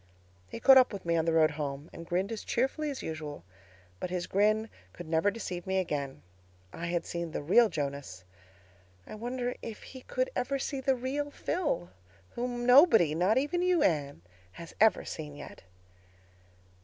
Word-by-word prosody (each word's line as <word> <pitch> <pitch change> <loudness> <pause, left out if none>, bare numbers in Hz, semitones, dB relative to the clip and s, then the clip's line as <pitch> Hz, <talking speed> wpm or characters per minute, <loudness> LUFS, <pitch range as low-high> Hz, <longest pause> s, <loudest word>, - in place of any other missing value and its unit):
"He - - -7
caught 265 +2 +8
up 255 - +3
with 200 -4 -7
me 170 0 +1
on 160 -1 +1
the 165 - +2
road 160 -1 +4
home, 145 0 -5
and 165 0 -9
grinned 185 +5 -1
as 225 - -5
cheerfully 270 +5 -1
as 275 - -5
usual. 155 - -6 0.6
But - - -4
his 180 -1 -2
grin 215 +3 +2 0.3
could 175 - -9
never 160 +5 +2
deceive 185 -5 -6
me 190 0 0
again. 145 -7 -3 0.5
I 170 - -5
had 170 0 -1
seen 170 -1 -4
the - - -3
real 220 +9 +5
Jonas. 140 - -5 0.8
I - - -10
wondered 245 +3 -4
if 225 - -8
he 260 - -11
could - - -2
ever 275 +2 -1
see 270 0 -3
the 265 0 +2
real 270 +4 -3
Phil—whom 175 - -4
nobody, 245 - +6
not 185 +8 +2
even 295 +6 0
you, 360 -2 +3
Anne, 145 - 0 0.3
has 170 -1 -10
ever 220 0 +4
seen 150 -2 -7
yet. - - -10
190 Hz, 170 wpm, -30 LUFS, 160-250 Hz, 0.8 s, caught